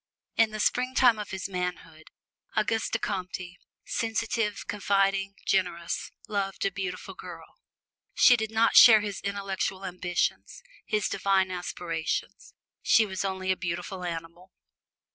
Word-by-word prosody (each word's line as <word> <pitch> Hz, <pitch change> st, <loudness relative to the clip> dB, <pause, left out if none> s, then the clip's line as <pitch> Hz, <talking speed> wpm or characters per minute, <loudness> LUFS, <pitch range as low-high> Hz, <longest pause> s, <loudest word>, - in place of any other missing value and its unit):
In 225 Hz, -1 st, +4 dB
the 215 Hz, 0 st, -6 dB
springtime 250 Hz, 0 st, +3 dB
of 210 Hz, -, -5 dB
his 190 Hz, 0 st, -4 dB
manhood, 180 Hz, -4 st, -5 dB, 0.5 s
Auguste 220 Hz, +1 st, 0 dB
Comte, 185 Hz, -2 st, -4 dB, 0.3 s
sensitive, 225 Hz, -2 st, -1 dB
confiding, 195 Hz, -1 st, +1 dB
generous, 175 Hz, -3 st, -1 dB, 0.2 s
loved 200 Hz, -3 st, -2 dB
a 195 Hz, -, +1 dB
beautiful 185 Hz, -1 st, -5 dB
girl. -, -, -11 dB, 0.6 s
She 245 Hz, -, +7 dB
did 220 Hz, -2 st, -2 dB
not 225 Hz, +1 st, +2 dB
share 220 Hz, -3 st, +10 dB
his 205 Hz, -2 st, -5 dB
intellectual 195 Hz, -1 st, -3 dB
ambitions, 180 Hz, -, -2 dB, 0.2 s
his 210 Hz, -1 st, +1 dB
divine 195 Hz, -1 st, +1 dB
aspiration: 175 Hz, -2 st, -3 dB, 0.5 s
she 225 Hz, -, +4 dB
was 190 Hz, -2 st, -4 dB
only 190 Hz, -1 st, -1 dB
a -, -, +2 dB
beautiful 180 Hz, +1 st, -4 dB
animal. 170 Hz, +2 st, -7 dB
195 Hz, 125 wpm, -27 LUFS, 180-210 Hz, 0.6 s, share